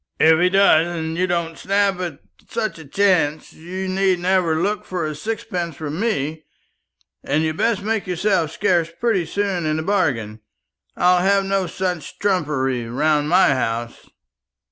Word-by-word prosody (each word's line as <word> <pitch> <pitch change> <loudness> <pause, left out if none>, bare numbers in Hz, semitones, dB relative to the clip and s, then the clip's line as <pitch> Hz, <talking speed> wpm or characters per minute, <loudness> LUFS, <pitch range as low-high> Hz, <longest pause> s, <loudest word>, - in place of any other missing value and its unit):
"If 160 0 +5
he 180 +1 +4
does, 180 -4 +4
and 160 0 -3
you 185 +2 0
don't 170 -2 -2
snap 195 -1 +1
at 175 -6 -4 0.3
such 215 -7 -3
a 160 - -11
chance, 170 -3 +1
you 185 +4 -6
need 190 0 +1
never 175 -3 +1
look 205 +4 -1
for 180 -3 -3
a 155 - -3
sixpence 175 -2 -4
from 155 +2 -5
me; 160 -8 -2 0.8
and 155 +2 0
you'd 155 0 -2
best 225 -4 +1
make 220 -2 -1
yourself 180 -2 +1
scarce 175 -3 +1
pretty 210 -8 +1
soon 190 -3 -1
into 155 +1 -1
the - - -12
bargain. 125 - 0 0.6
I'll 180 0 +4
have 195 +1 +2
no 195 -1 0
such 180 -3 -4
trumpery 145 -10 0
about 145 +5 +1
my 180 +5 +4
house." 120 -3 -2
175 Hz, 160 wpm, -21 LUFS, 155-195 Hz, 0.8 s, If